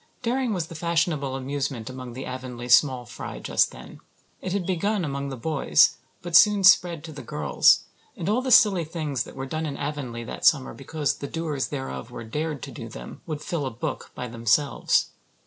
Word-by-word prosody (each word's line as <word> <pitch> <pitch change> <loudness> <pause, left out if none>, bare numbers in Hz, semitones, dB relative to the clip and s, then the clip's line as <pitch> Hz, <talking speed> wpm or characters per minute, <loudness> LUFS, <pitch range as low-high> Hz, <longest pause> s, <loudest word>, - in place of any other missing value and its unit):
Daring 250 0 0
was 180 -5 -1
the 165 - -11
fashionable 165 -4 0
amusement 135 -3 -3
among 130 -1 -7
the 130 +2 -6
Avonlea 125 -1 -6
small 125 -1 +5
fry 120 0 -7
just - - +2
then. - - -12 0.4
It 185 - -4
had 195 -1 -1
begun 190 +2 0
among 140 -1 -3
the 135 - -6
boys, 150 +2 +3 0.3
but 175 -1 -2
soon 205 +1 +7
spread 175 -4 +5
to 165 - -8
the 145 -2 -8
girls, 75 - +3 0.3
and 165 - -4
all 220 +5 +2
the 260 - -3
silly 210 -8 +6
things 150 -6 -3
that - - -12
were 135 0 -4
done 155 +3 -3
in 140 - -5
Avonlea 140 -5 -4
that - - -7
summer 135 -4 +4
because 145 +2 -2
the 140 - -5
doers 155 -3 -2
thereof 135 -4 -5
were 120 -1 -8
"dared" 150 +4 -3
to - - -6
do - - -8
them - - -10
would 150 -2 -4
fill 155 -6 -2
a - - -1
book 115 0 -5
by 125 - -4
themselves. 120 +4 +1
145 Hz, 200 wpm, -25 LUFS, 130-170 Hz, 0.4 s, soon